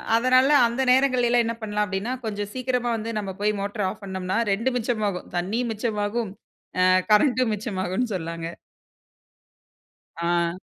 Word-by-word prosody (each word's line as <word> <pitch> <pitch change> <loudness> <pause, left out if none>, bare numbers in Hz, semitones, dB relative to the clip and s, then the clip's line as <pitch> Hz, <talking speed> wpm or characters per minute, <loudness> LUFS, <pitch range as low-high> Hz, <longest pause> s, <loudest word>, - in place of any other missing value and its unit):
அதனால, 255 +3 +4 0.2
அந்த 235 +3 -2
நேரங்களில 255 -2 +3
எல்லாம் 240 -1 +4
என்ன 230 0 -2
பண்ணலாம் 210 -1 -1
அப்டின்னா, 205 +5 -2
கொஞ்சம் 205 -1 -3
சீக்கிரமா 250 -2 -1
வந்து 225 +1 -5
நம்ம 195 -2 -4
போய் 210 0 +2
மோட்ர 205 +1 -3
ஆஃப் 200 - -9
பண்னோம்னா, 190 +1 -3
2ம் 230 +6 0
மிச்சமாகும். 215 -6 -2
தண்ணியும் 225 +7 -1
மிச்சமாகும். 210 -1 -2 0.5
ஆ, - - +5 0.2
கரண்ட்டும் 245 +1 +4
மிச்சமாகும்னு 205 +1 -2
சொல்லலாங்க. 165 -1 -4 1.7
ஆ. 170 0 +1
215 Hz, 135 wpm, -24 LUFS, 195-245 Hz, 1.7 s, ஆ